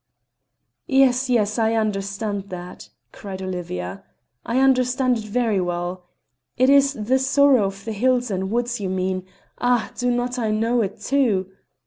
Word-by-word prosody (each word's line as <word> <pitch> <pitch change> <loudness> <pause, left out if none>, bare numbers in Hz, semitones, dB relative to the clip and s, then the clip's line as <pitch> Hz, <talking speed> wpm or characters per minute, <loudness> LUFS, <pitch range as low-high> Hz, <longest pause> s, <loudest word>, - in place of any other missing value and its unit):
"Yes, 265 -3 +3
yes, 215 -2 +1
I 225 0 +2
understand 200 -1 -2
that," 180 0 -9 0.2
cried 195 -2 -8
Olivia. 165 - -5 0.4
"I 235 - -2
understand 255 -1 +2
it 215 - -7
very 215 -2 0
well. 175 +1 -3 0.5
It 255 +2 +4
is 280 0 +5
the 245 +2 0
sorrow 265 -3 +4
of 195 0 -6
the 225 - -3
hills 245 +2 +1
and 190 0 -2
woods 240 +2 -1
you 195 -2 -3
mean; 185 0 -2 0.3
ah! 245 -2 +1
do 245 - -2
I - - +2
not 245 +1 -2
know 230 +3 +1
it, 200 - -3
too? 220 -9 +1
220 Hz, 150 wpm, -22 LUFS, 190-250 Hz, 0.5 s, is